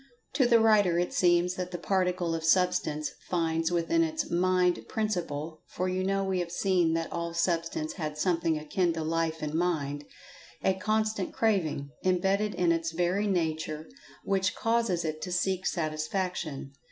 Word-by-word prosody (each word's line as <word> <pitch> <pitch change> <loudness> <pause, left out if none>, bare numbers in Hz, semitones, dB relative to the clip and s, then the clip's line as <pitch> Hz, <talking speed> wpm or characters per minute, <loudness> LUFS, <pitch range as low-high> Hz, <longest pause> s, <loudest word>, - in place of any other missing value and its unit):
To 260 - +3
the 235 -1 +5
writer 210 -6 +4
it 175 +1 0
seems 175 0 +3
that 180 -1 -4
the 180 - -5
Particle 180 -1 0
of 165 -1 -3
Substance 160 -3 +2 0.2
finds 165 -1 0
within 175 - +2
its 315 -1 -2
Mind 180 0 +2
principle 165 -8 -3
(for 185 - -3
you 185 0 -1
know 195 +1 +1
we 190 -1 0
have 175 -1 -3
seen 175 -3 +2
that 165 0 -2
all 170 0 -3
Substance 165 -2 -1
had 155 -4 -4
something 165 -1 +1
akin 170 +3 0
to 160 -1 -3
Life 160 0 -1
and 150 0 -3
Mind) 150 -4 -1 0.6
a 190 - +3
constant 215 0 -1
craving, 160 -10 0
imbedded 195 +3 +1
in 175 -2 +2
its 165 -1 -1
very 180 +5 +1
nature, 160 -4 -1 0.4
which 190 -1 0
causes 225 -7 0
it 155 0 -3
to 180 - -4
seek 185 +1 0
Satisfaction. 155 -2 -2
175 Hz, 160 wpm, -29 LUFS, 160-190 Hz, 0.6 s, the